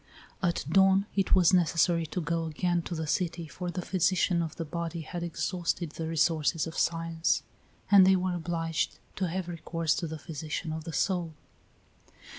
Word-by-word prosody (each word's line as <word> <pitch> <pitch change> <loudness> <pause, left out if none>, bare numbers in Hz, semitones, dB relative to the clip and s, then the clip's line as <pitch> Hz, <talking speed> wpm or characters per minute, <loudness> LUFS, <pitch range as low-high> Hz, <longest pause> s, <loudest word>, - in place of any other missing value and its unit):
At 175 -5 0
dawn 190 +3 +4
it 195 -1 +3
was 185 -1 +5
necessary 170 -1 +3
to 180 - -3
go 165 +1 -1
again 175 +2 0
to 175 - -3
the 160 0 -3
city, 170 +2 -1
for 180 +3 -5
the 175 +1 -4
physician 180 -1 +2
of 160 -2 -4
the 165 - -4
body 170 +1 -4
had 170 +2 -6
exhausted 170 -1 -2
the 160 0 -5
resources 160 -1 +1
of 165 - -7
science, 165 0 0 0.5
and 200 -2 +9
they 190 - +6
were 185 0 0
obliged 165 -1 -2 0.2
to 190 - 0
have 180 +1 -3
recourse 165 -1 -1
to 170 - -2
the 160 0 -5
physician 155 +1 -5
of 160 0 -6
the 165 - -5
soul. 175 -4 0
170 Hz, 175 wpm, -29 LUFS, 160-180 Hz, 0.5 s, and